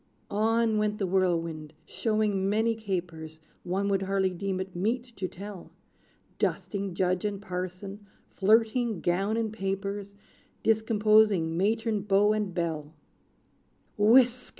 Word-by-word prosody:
On 220 +1 +2
went 210 0 0
the 200 - -1
Whirlwind, 165 -4 0
showing 210 -1 0
many 220 +2 +2
capers 170 -7 -5 0.2
One 190 +3 -1
would 195 -1 +1
hardly 190 -1 +1
deem 190 +1 -3
it 190 -1 -6
meet 235 +6 -2
to 190 - -2
tell; 195 0 -9 0.7
Dusting 200 -3 -2
Judge 180 0 0
and 205 -1 -2
Parson 195 +2 -6 0.2
flirting 220 0 +2
gown 195 +5 0
and 220 -2 -1
papers, 195 0 -4 0.5
Discomposing 215 -5 +3
matron, 215 +3 0
beau 205 +1 +3
and 210 -3 -1
belle. 160 -3 -3 1.0
"Whisk!" 245 +4 +4
200 Hz, 120 wpm, -28 LUFS, 185-215 Hz, 1.0 s, Whisk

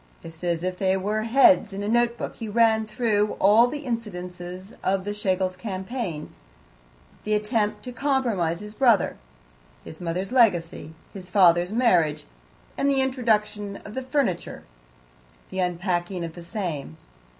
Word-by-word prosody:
As 165 +1 -3
if 185 0 -3
they 190 -1 +2
were 210 +3 -1
heads 225 -4 +4
in 200 +1 -4
a - - -3
note 240 +1 +2
book, - - -6
he 225 -2 -6
ran 220 0 +3
through 215 -2 0
all 215 +5 +6
the 290 +2 -6
incidents 180 -7 -5 0.4
of 190 0 +1
the 205 +1 -3
Schlegels' 190 -2 -1
campaign: 190 -3 -5 0.9
the 215 0 +1
attempt 210 0 -1
to 250 - -6
compromise 240 - 0
his 210 0 -8
brother, 235 -4 +3 0.7
his 160 - -10
mother's 180 +4 -3
legacy, 175 - +2 0.2
his 185 -2 -10
father's 180 -2 +4
marriage, 180 -11 +2 0.6
the 275 -1 +2
introduction 220 -6 0
of 210 - -9
the 260 - -3
furniture, 255 -9 -2 0.9
the 190 - -4
unpacking 180 0 -1
of 165 - -7
the 175 - -10
same. 170 - -5
205 Hz, 140 wpm, -25 LUFS, 180-230 Hz, 0.9 s, all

